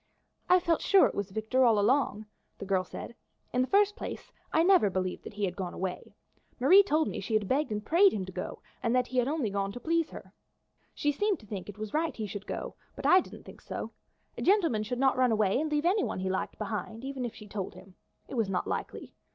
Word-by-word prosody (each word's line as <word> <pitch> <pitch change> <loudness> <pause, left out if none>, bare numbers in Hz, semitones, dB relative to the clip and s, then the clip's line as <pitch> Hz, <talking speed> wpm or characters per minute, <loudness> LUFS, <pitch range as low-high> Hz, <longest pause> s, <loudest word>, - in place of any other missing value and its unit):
"I 365 - +7
felt 340 -2 +1
sure 395 -2 +6
it - - 0
was 200 -1 -3
Victor 220 +6 +1
all 230 -3 +5
along," 215 0 +2 0.3
the - - -7
girl 190 -1 +1
said. 185 - -8 0.4
"In 250 - +2
the 255 - +1
first 410 +3 +3
place, - - -7 0.2
I 320 - +3
never 365 - +5
believed 185 -1 -3
that - - -9
he 205 -1 0
had 180 -1 -4
gone 185 -2 -5
away. 185 -1 -5 0.4
Marie 340 +11 +8
told 315 -6 +1
me - - -4
she 220 - -2
had 210 -2 +1
begged 280 +2 0
and 210 0 -3
prayed 375 - +5
him 190 -3 -3
to 190 - -8
go, 185 - -6 0.2
and 235 +1 +1
that 250 0 +3
he 255 0 -1
had 245 - +1
only 280 -8 -1
gone 195 0 -1
to 245 - -7
please 330 +2 0
her. - - -11 0.6
She 290 - +1
seemed 400 +3 0
to - - -15
think 200 -2 -6
it 205 - -9
was 215 -1 -6
right 315 +1 0
he 220 - -4
should 205 0 -7
go, - - -4 0.2
but - - -8
I 370 - +7
didn't - - -8
think - - -13
so. - - -6 0.4
A - - -6
gentleman 335 - +3
would 250 - -2
not 265 0 +2
run 255 -2 +3
away 215 +1 +2
and 310 -1 -2
leave 300 +1 0
anyone 390 +4 +1
he 190 0 -1
liked 190 - -3
behind, 215 +2 -5
even 270 -2 -4
if 240 - -4
she 210 - -11
told 200 -2 -5
him. 185 +1 -14 0.3
It - - -10
was 225 -5 0
not 185 -2 -1
likely. - - -5
235 Hz, 245 wpm, -29 LUFS, 200-310 Hz, 0.6 s, Marie